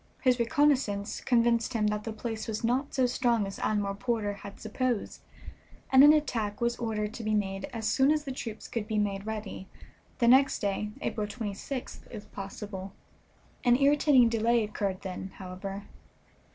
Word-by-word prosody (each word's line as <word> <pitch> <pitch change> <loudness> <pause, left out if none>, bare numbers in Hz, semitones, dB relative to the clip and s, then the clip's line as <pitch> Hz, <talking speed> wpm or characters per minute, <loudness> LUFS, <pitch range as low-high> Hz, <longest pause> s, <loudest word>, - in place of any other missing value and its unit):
His 255 -2 +3
reconnoissance 245 -6 +1
convinced 235 0 +2
him 220 -2 +1
that 210 0 -3
the 225 - -3
place 220 0 -5
was 220 0 -3
not 255 +5 0
so 260 -2 +3
strong 240 -3 +1
as 195 - -7
Admiral 205 -2 0
Porter 210 -1 -1
had 200 0 -10
supposed, 235 +1 -2 0.7
and 265 +1 +8
an 295 - +10
attack 230 -9 0
was 235 0 +1
ordered 215 -2 -2
to 235 - -7
be 215 0 +1
made 195 -2 -1
as 225 -2 -4
soon 265 +1 +3
as 305 -1 +1
the 275 - -5
troops 230 -4 -6
could 225 -3 -4
be 215 -1 -1
made 200 -1 -1
ready, 215 -3 -5 0.5
the 235 - +2
next 265 +3 +6
day, 205 +1 -2
April 210 -2 -2
26th, 220 +4 -5
if 210 -2 -10
possible. 195 -1 -7 0.7
An 245 -1 +5
irritating 280 -2 +5
delay 230 0 +2
occurred 200 -3 -3
then, 190 0 -6
however. 195 +2 -6
220 Hz, 165 wpm, -29 LUFS, 205-245 Hz, 0.7 s, an